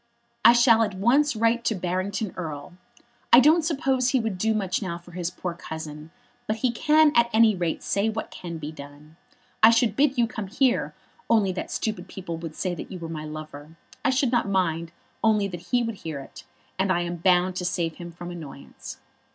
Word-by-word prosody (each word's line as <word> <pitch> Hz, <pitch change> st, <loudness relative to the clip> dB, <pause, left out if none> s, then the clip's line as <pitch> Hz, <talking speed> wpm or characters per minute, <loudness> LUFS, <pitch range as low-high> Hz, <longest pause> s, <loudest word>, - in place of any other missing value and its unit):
"I -, -, +9 dB
shall 235 Hz, -1 st, +5 dB
at 210 Hz, -4 st, 0 dB
once 260 Hz, +8 st, +3 dB
write 230 Hz, +2 st, +1 dB
to 220 Hz, -, +1 dB
Barrington 185 Hz, +3 st, -2 dB
Erle. 155 Hz, -3 st, -6 dB, 0.6 s
I 240 Hz, -, +10 dB
don't 310 Hz, +6 st, +5 dB
suppose 270 Hz, -5 st, 0 dB
he 260 Hz, -, +2 dB
would 220 Hz, -5 st, -3 dB
do 220 Hz, +2 st, +1 dB
much 190 Hz, -2 st, -1 dB
now 170 Hz, -4 st, -3 dB
for 175 Hz, +1 st, -16 dB
his 175 Hz, 0 st, -3 dB
poor 180 Hz, -1 st, -5 dB
cousin, 160 Hz, -2 st, -8 dB, 0.4 s
but 215 Hz, -, 0 dB
he 250 Hz, -, +3 dB
can 305 Hz, +4 st, +4 dB
at 235 Hz, 0 st, +4 dB
any 220 Hz, -1 st, +5 dB
rate 175 Hz, -3 st, -2 dB
say 200 Hz, +2 st, 0 dB
what 220 Hz, 0 st, -5 dB
can 170 Hz, -2 st, -7 dB
be 155 Hz, -1 st, -6 dB
done. 145 Hz, +1 st, -13 dB, 0.5 s
I 220 Hz, -, +9 dB
should 230 Hz, -2 st, +3 dB
bid 275 Hz, 0 st, +2 dB
you 240 Hz, -, +4 dB
come 220 Hz, -3 st, -6 dB
here, 255 Hz, +5 st, +1 dB, 0.3 s
only 210 Hz, -4 st, +3 dB
that 185 Hz, -, -5 dB
stupid 210 Hz, -5 st, -3 dB
people 180 Hz, -3 st, -6 dB
would 165 Hz, -1 st, -7 dB
say 185 Hz, -2 st, -2 dB
that -, -, -8 dB
you 185 Hz, -, -6 dB
were 165 Hz, -2 st, -7 dB
my 155 Hz, -2 st, -5 dB
lover. 155 Hz, 0 st, -9 dB, 0.3 s
I -, -, +3 dB
should 260 Hz, -1 st, +1 dB
not 240 Hz, -5 st, +1 dB
mind, 170 Hz, -4 st, 0 dB, 0.3 s
only 215 Hz, -2 st, +3 dB
that 175 Hz, -1 st, -9 dB
he 245 Hz, -1 st, +2 dB
would 230 Hz, -3 st, -4 dB
hear 160 Hz, -5 st, -6 dB
it, 135 Hz, -, -12 dB, 0.3 s
and 190 Hz, 0 st, +2 dB
I 175 Hz, -1 st, +1 dB
am 175 Hz, 0 st, -3 dB
bound 180 Hz, +1 st, +2 dB
to 180 Hz, -, -3 dB
save 170 Hz, -2 st, -2 dB
him 175 Hz, -1 st, -8 dB
from 175 Hz, +1 st, -8 dB
annoyance. 155 Hz, -5 st, -10 dB
190 Hz, 210 wpm, -25 LUFS, 170-230 Hz, 0.6 s, I